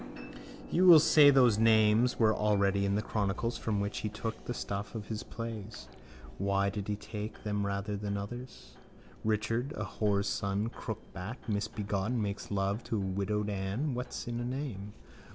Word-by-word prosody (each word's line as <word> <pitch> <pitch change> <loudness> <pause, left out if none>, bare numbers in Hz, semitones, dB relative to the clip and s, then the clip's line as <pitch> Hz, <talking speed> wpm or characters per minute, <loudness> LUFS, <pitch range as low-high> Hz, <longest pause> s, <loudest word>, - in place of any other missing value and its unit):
On. - - -11 0.4
—You 185 +2 +4
will 170 -2 +11
say 145 -1 +7
those 125 -6 +5
names 110 +1 +4
were 110 -2 +4
already 100 -2 +2
in 100 - +1
the 105 - 0
chronicles 105 +3 -1
from 105 -2 -1
which 100 +1 -2
he 110 - -2
took 110 +1 -5
the 120 - -3
stuff 100 +1 -4
of 110 -2 -6
his 110 -1 -3
plays. 115 -2 -7 0.5
Why 100 0 +1
did 100 0 -5
he 105 - 0
take 105 +1 -7
them 105 -1 -1
rather 100 +1 -2
than 100 0 -3
others? 120 +6 -8 0.5
Richard, 110 +5 0
a - - -2
whoreson 100 +1 0
crookback, 110 0 -7
misbegotten, 105 +1 -1
makes 100 -2 -3
love 100 +2 -1
to 115 - -2
a - - 0
widowed 100 +2 -1
Ann 100 +9 -2
(what's 125 0 -5
in 120 0 -3
a - - -2
name?) 120 -6 -4
105 Hz, 170 wpm, -31 LUFS, 100-115 Hz, 0.5 s, will